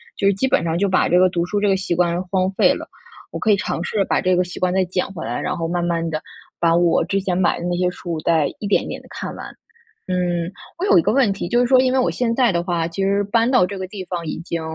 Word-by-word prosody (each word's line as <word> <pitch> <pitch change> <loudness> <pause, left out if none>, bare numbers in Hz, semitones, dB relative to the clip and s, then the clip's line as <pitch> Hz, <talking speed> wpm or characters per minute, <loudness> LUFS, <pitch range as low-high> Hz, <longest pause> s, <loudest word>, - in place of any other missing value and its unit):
就 200 0 +2
基 200 +7 0
本 255 - +2
上 165 0 -1
就 200 +3 +1
把 185 - +2
这 180 - +4
个 185 - +6
读 175 -1 -1
书 205 +3 -1
这 205 - +1
个 195 - +3
习 190 -1 -2
惯 175 +1 +1
荒 190 -1 +1
废 - - +4
了， - - -7 0.4
我 - - -5
可 215 - +1
以 200 - +4
尝 170 - -3
试 200 +1 0
把 - - +1
这 185 - +2
个 180 0 +2
习 180 - -9
惯 180 -1 +1
再 190 0 +2
捡 180 +1 -1
回 170 -4 -7
来， 120 +2 -3
然 - - -2
后 165 -1 -2
慢 175 +1 -1
慢 170 -1 -1
地 155 -1 -4 0.3
把 165 -1 +2
我 170 0 +3
之 195 +2 -1
前 185 -2 -1
买 180 -2 +1
的 170 - -5
那 175 - 0
些 180 0 +1
书 175 -2 -5
再 160 -3 +2
一 - - -5
点 200 - +3
一 - - -7
点 - - -6
地 - - -19
看 - - -6
完。 - - -9 0.6
嗯， 175 -2 -1 0.3
我 360 - -2
有 395 - +6
一 - - +4
个 210 - +1
问 255 -6 +3
题 195 -3 -4
就 240 - +2
是 245 - +3
说， 255 +1 +5
因 255 0 +2
为 265 - +2
我 250 - +1
现 230 -2 -1
在 245 -2 +3
的 170 -2 0
话， 170 -2 -1
其 195 +3 -3
实 200 +1 +2
搬 230 +3 +2
到 255 -6 +4
这 195 +2 -4
个 190 - -4
地 190 0 -7
方 170 -2 -4
已 155 - -4
经 170 0 -4
180 Hz, 325 characters per minute, -20 LUFS, 170-200 Hz, 0.6 s, 个